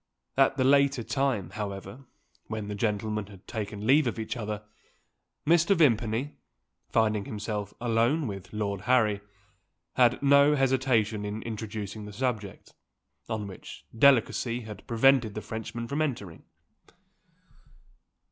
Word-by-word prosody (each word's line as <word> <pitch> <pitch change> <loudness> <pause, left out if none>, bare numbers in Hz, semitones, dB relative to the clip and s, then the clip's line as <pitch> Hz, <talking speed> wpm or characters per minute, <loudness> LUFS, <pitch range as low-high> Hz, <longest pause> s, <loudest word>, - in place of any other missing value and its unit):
At 135 0 +3
the 130 - +2
later 140 -1 +4
time, 130 -7 -1
however, 100 +4 -6 0.4
when 110 -2 -5
the - - -3
gentlemen 105 0 -1
had 100 -1 -15
taken 105 -1 -5
leave 140 +3 +5
of 120 - -2
each 110 +2 -4
other, 105 -3 -4 0.8
Mr. 170 +5 +4
Vimpany 120 - +1 0.5
finding 110 -3 +1
himself 105 -1 -4
alone 120 +6 +1
with 95 -5 -6
Lord 100 -2 -3
Harry 110 -5 +3 0.7
had 120 -1 +4
no 140 +1 +6
hesitation 125 -6 +1
in 105 +2 -4
introducing 110 -2 -5
the 105 - -9
subject, 110 -4 -4 0.6
on 110 -2 -2
which 95 -2 -10
delicacy 120 -1 +3
had 105 -3 -10
prevented 120 -2 +3
the 110 - -3
Frenchmen 110 +2 -5
from 140 +4 -2
entering. 110 - -4
110 Hz, 125 wpm, -28 LUFS, 105-130 Hz, 0.8 s, no